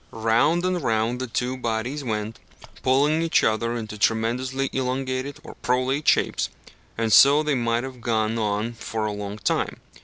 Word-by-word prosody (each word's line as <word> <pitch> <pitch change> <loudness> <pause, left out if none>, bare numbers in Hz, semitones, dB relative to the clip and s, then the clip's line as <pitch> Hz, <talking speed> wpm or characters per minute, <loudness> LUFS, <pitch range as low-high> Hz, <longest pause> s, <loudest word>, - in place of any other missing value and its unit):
Round 115 - +2
and 185 -1 0
round 115 0 0
the 130 - -3
two 125 +2 -2
bodies 120 +4 -3
went, 110 -2 -3 0.4
pulling 145 +5 +3
each 165 -1 +2
other 115 +2 +1
into 110 -2 -6
tremendously 125 +5 0
elongated 130 +1 -2
or - - -10
prolate 130 +4 -1
shapes, - - +2 0.5
and 115 -1 +1
so 145 +3 +7
they 150 -1 0
might 120 -2 0
have 130 -2 -8
gone 110 -2 0
on 105 +2 -1
for 110 -1 -4
a 105 - -1
long 100 0 -5
time. 105 - -1
120 Hz, 160 wpm, -24 LUFS, 110-135 Hz, 0.5 s, so